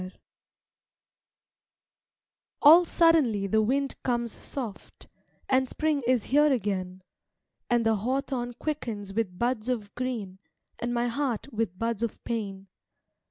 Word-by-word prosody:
SONG 185 0 -7 2.5
All 330 +4 +9
suddenly 315 - +3
the 220 +3 +2
wind 275 +5 0
comes 240 -2 -1
soft, 230 -5 -7 0.4
And 260 -1 +2
Spring 310 -2 0
is 250 -4 +3
here 295 +2 +4
again; 190 -6 -2 0.7
And 240 -1 +2
the 225 -1 +3
hawthorn 250 +2 -2
quickens 230 -9 -4
with 195 -4 -2
buds 240 +1 -1
of 220 -5 -3
green, 225 -7 -4 0.4
And 240 - -2
my 240 0 0
heart 260 0 -2
with 220 -5 -2
buds 230 0 -2
of 235 -2 -2
pain. 200 -4 -4
235 Hz, 120 wpm, -27 LUFS, 210-265 Hz, 2.5 s, All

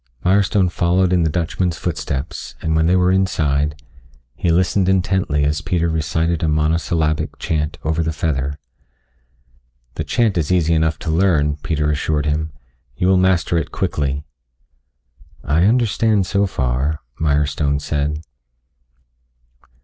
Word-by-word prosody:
Mirestone 95 0 +3
followed 90 +1 +2
in 90 - +3
the 80 - +2
Dutchman's 85 +1 -1
footsteps, 75 -5 -4
and 80 0 -1
when 80 +1 +3
they 90 - +3
were 90 0 +3
inside, 75 -6 0 0.5
he 85 - -2
listened 90 +2 +2
intently 95 -5 +1
as 75 +1 0
Peter 85 +2 0
recited 80 +1 -1
a 80 - +1
monosyllabic 80 0 0
chant 75 -1 -2
over 80 +1 0
the 80 0 -1
feather. 70 -3 -2 1.4
"The - - -3
chant 110 -7 +1
is 80 +1 -1
easy 85 -3 +2
enough 80 -1 +1
to 80 - 0
learn," 80 -4 +2
Peter 75 0 -1
assured 75 0 -1
him. 75 +1 -1 0.4
"You 90 +8 +1
will 95 - +5
master 90 -2 +2
it - - -5
quickly." 70 0 -2 1.2
"I 80 +5 +2
understand 110 -3 +2
so 100 +2 +1
far," 65 +1 -1 0.2
Mirestone 75 -1 +1
said. 75 +1 -2
80 Hz, 135 wpm, -19 LUFS, 75-90 Hz, 1.4 s, will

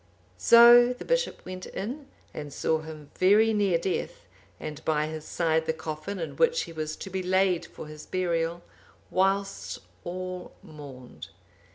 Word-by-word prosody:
So 240 +1 +8
the 250 - -10
bishop - - -1
went 185 0 -7
in, 265 +8 -6 0.3
and 145 -1 -7
saw 160 +3 0
him 155 -2 -10
very 210 +4 +5
near 200 -5 +2
death, 195 - -3 0.3
and 155 0 -7
by 155 -1 +1
his 155 0 -6
side 160 -1 0
the 160 - +1
coffin 160 +4 -5
in 165 -3 -5
which 485 0 +3
he 165 - -9
was 155 -1 -4
to 195 - -8
be 190 0 -2
laid 185 -1 +1
for - - -10
his 150 0 -11
burial, 170 -2 -1 0.5
whilst 195 +1 0 0.3
all 185 0 -6
mourned. 140 -5 -11
180 Hz, 155 wpm, -27 LUFS, 155-200 Hz, 0.5 s, So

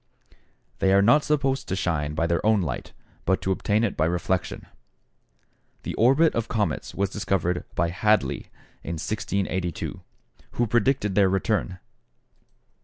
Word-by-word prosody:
They 95 - +3
are 100 - +6
not 140 +8 +5
supposed 135 -3 0
to 95 - -1
shine 75 -5 -1
by 80 - +1
their 85 0 0
own 110 -1 +4
light, 70 -7 -4 0.3
but 95 +1 +1
to 95 - 0
obtain 105 +3 +1
it 110 - 0
by 80 - +1
reflection. 90 +2 -2 1.2
The - - -4
orbit 135 +8 +4
of 115 -1 -1
comets 110 -3 -2
was 100 -1 0
discovered 95 -4 -1
by 85 +1 +1
Hadley 105 +3 +1 0.3
in 85 - -5
1682, 95 -2 -3 0.5
who 120 - +1
predicted 120 -2 +1
their 95 -1 +4
return. 95 -1 0
100 Hz, 140 wpm, -25 LUFS, 90-110 Hz, 1.2 s, are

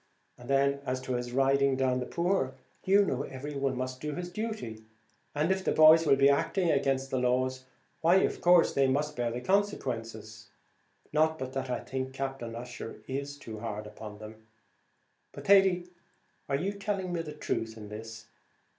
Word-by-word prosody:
And 120 +1 -13
then, 140 0 +2
as 130 -1 -2
to 130 0 -3
his 120 0 -3
riding 135 +1 +3
down 130 -1 +1
the 125 - -4
poor; 170 -7 0 0.3
you 200 +2 +5
know 135 -7 -1
every 140 +2 -6
one 135 -2 -1
must 130 0 -4
do 150 -1 -3
his 175 +2 -5
duty, 210 - -5 0.5
and 155 +5 +1
if 190 0 0
the - - +1
boys 155 +1 +7
will 135 - +6
be 135 0 +5
acting 165 +5 +2
against 135 -1 0
the 130 - +1
laws, 130 +1 0 0.4
why, 170 +3 +5
of - - -1
course, 175 -1 +5
they 135 -1 +3
must 150 +3 0
bear 120 -1 -1
the 120 +1 -4
consequences. 115 - -2 0.7
Not 160 +1 +3
but 130 -3 -5
that 135 -1 -3
I 125 - -2
think 130 0 -4
Captain 135 -4 -4
Ussher 115 -1 -7
is 140 +2 -4
too 110 -5 -8
hard 105 -2 -5
upon 105 0 -9
them. 110 +1 -12 0.9
But, - - -9
Thady, 190 -3 +5 0.6
are 140 - +1
you 190 +7 -2
telling 200 -3 -3
me 170 - -1
the 155 -2 -7
truth 115 -6 -3
in 105 -1 -9
this? 110 +1 -8
135 Hz, 180 wpm, -30 LUFS, 125-160 Hz, 0.9 s, boys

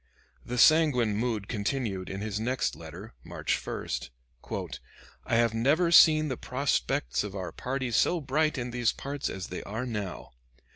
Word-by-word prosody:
The 125 - -4
sanguine 125 -7 +5
mood 110 -2 -1
continued 100 -3 -2
in 95 +1 -5
his 105 -1 -3
next 125 +4 -1
letter, 85 +7 -10
March - - -2
1: 60 - -3 1.3
"I - - +1
have 115 -1 +3
never 150 +10 +2
seen 155 -2 +7
the 130 -4 -3
prospects 125 - 0
of 105 -1 -6
our 95 -2 -4
party 130 -1 -3
so 170 +9 +3
bright 150 +2 0
in 120 -1 -3
these 120 -1 +1
parts 140 0 -4
as 95 0 -6
they 90 - -5
are 110 +5 -4
now. 105 -7 -5
120 Hz, 155 wpm, -28 LUFS, 105-135 Hz, 1.3 s, seen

